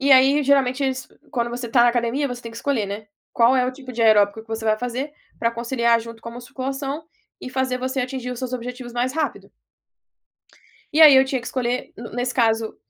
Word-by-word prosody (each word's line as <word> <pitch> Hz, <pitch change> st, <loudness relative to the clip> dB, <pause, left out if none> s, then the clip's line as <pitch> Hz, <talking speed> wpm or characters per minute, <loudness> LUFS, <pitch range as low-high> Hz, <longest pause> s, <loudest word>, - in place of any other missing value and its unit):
E 275 Hz, +1 st, +1 dB
aí 270 Hz, +3 st, +6 dB
geralmente 275 Hz, -1 st, +2 dB
eles 260 Hz, -1 st, -2 dB, 0.2 s
quando 240 Hz, -4 st, -1 dB
você 240 Hz, 0 st, -4 dB
está 240 Hz, +1 st, +4 dB
na 240 Hz, -, +6 dB
academia 240 Hz, +4 st, 0 dB
você 245 Hz, 0 st, -6 dB
tem 230 Hz, -, -7 dB
que 230 Hz, -, -12 dB
escolher, 240 Hz, -5 st, -1 dB
né, 205 Hz, +2 st, -6 dB, 0.3 s
qual 240 Hz, +2 st, +4 dB
é 250 Hz, -, +3 dB
o 255 Hz, -, -2 dB
tipo 255 Hz, -1 st, -10 dB
de 230 Hz, -, -1 dB
aeróbico 215 Hz, -1 st, +4 dB
que 225 Hz, -, -27 dB
você 225 Hz, 0 st, -4 dB
vai 215 Hz, 0 st, +2 dB
fazer 250 Hz, +4 st, -4 dB, 0.3 s
para 230 Hz, -, +1 dB
conciliar 235 Hz, 0 st, +1 dB
junto 230 Hz, 0 st, -10 dB
com 230 Hz, -, -7 dB
a -, -, -11 dB
musculação 270 Hz, +4 st, -5 dB, 0.4 s
e -, -, -6 dB
fazer 260 Hz, -1 st, -1 dB
você 260 Hz, +1 st, -2 dB
atingir 250 Hz, 0 st, -4 dB
os 245 Hz, -, -7 dB
seus 255 Hz, -1 st, -4 dB
objetivos 250 Hz, 0 st, -6 dB
mais 245 Hz, +2 st, -1 dB
rápido. 310 Hz, 0 st, -3 dB, 1.4 s
E 310 Hz, -, +2 dB
aí 300 Hz, -4 st, +10 dB
eu 265 Hz, -, +6 dB
tinha 265 Hz, -1 st, -2 dB
que 230 Hz, -, -11 dB
escolher, 250 Hz, -1 st, -2 dB
ne 235 Hz, 0 st, -8 dB
nesse 245 Hz, +1 st, -2 dB
caso, 225 Hz, -2 st, +1 dB
250 Hz, 225 wpm, -22 LUFS, 230-265 Hz, 1.4 s, aí